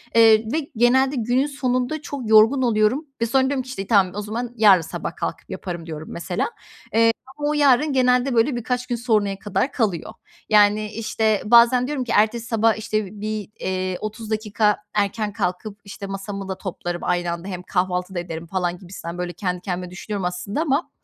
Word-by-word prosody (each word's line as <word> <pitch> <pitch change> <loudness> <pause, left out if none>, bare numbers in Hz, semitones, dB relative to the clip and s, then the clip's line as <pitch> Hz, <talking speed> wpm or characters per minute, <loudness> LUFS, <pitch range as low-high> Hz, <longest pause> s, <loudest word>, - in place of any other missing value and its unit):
Eee, 225 -1 +6
ve 310 -2 -2
genelde 260 +4 +3
günün 245 +3 +1
sonunda 260 +1 -1
çok 285 -8 -6
yorgun 220 +5 +6
oluyorum 235 +5 +2 0.2
ve - - +3
sonra 260 +3 +2
diyorum 265 0 0
ki, 255 - -16
işte, 195 -7 -5
tamam 195 -5 +3
o 210 - -2
zaman 230 +3 -4
yarın 205 -6 +6
sabah 160 - -5
kalkıp - - -5
yaparım 175 -3 -6
diyorum 155 -1 -7
mesela. 175 +1 -2 0.5
Eee, 230 0 +5 0.3
ama 295 0 -1
o - - +1
yarın 285 0 +4
genelde 250 0 +3
böyle 240 +3 +3
birkaç 250 +1 -2
gün 240 - -1
sonraya 215 -5 0
kadar 210 +7 -1
kalıyor. 205 - -1 0.4
Yani, 210 0 +4
işte, 220 -1 0
bazen 240 +3 +6
diyorum 285 -3 -2
ki 245 - -5
ertesi 225 +2 +2
sabah, 225 -1 +2
işte, 215 -2 -3
bir, 215 -2 -3
eee, 185 -1 -2
30 215 +1 -6
dakika 210 -1 +1 0.2
erken 210 +1 -1
kalkıp, 205 +1 -3
işte, 200 0 -8
masamı 195 0 -6
da 190 - -3
toplarım 175 -2 -5
aynı 175 -1 0
anda 170 +2 -5
hem 180 -2 -5
kahvaltı 180 0 -1
da - - 0
ederim 170 -1 -6
falan 180 0 -2
gibisinden 175 -2 -8
böyle 180 0 -3
kendi 180 -2 -3
kendime 180 -1 -4
düşünüyorum 195 +1 -4
aslında 180 - -3
ama 300 0 0
215 Hz, 185 wpm, -22 LUFS, 185-245 Hz, 0.5 s, Eee